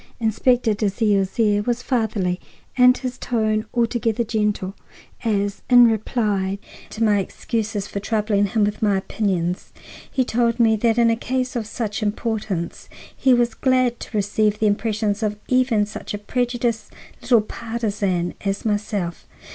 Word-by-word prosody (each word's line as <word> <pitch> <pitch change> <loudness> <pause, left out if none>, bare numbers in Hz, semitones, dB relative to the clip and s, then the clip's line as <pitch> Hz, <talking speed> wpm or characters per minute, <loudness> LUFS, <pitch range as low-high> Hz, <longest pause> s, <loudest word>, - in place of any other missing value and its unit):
Inspector 230 +1 +2
Dalzell's 205 -1 0
air 205 -2 +3
was 240 +3 -2
fatherly 215 -7 0 0.4
and 250 0 +6
his 255 -2 -5
tone 215 -2 0
altogether 235 -1 0
gentle 210 -4 -1 0.5
as, 205 -3 0
in 245 -1 +8
reply 210 -3 0 0.3
to 225 - -3
my 210 -2 +4
excuses 210 +1 -3
for 200 - -5
troubling 210 -1 +1
him 220 +1 +1
with 205 0 -1
my 205 -3 +3
opinions, 185 -3 -2 0.4
he 260 -2 0
told 235 0 +1
me 225 -2 +5
that 225 +1 +1
in 235 -1 +5
a - - +2
case 255 +2 -2
of 225 -3 -2
such 215 -1 -3
importance 210 -4 -3 0.3
he 265 - +2
was 240 -1 +3
glad 255 -2 +1
to 220 - -5
receive 210 +1 +1
the 215 - 0
impressions 210 0 0 0.2
even 255 -4 +3
of 205 - 0
such 215 - -6
a - - -3
prejudiced 240 0 -2 0.3
little 235 -4 +4
partizan 210 -6 -2
as 200 +1 -2
myself. 205 -5 -2
220 Hz, 145 wpm, -22 LUFS, 205-235 Hz, 0.5 s, in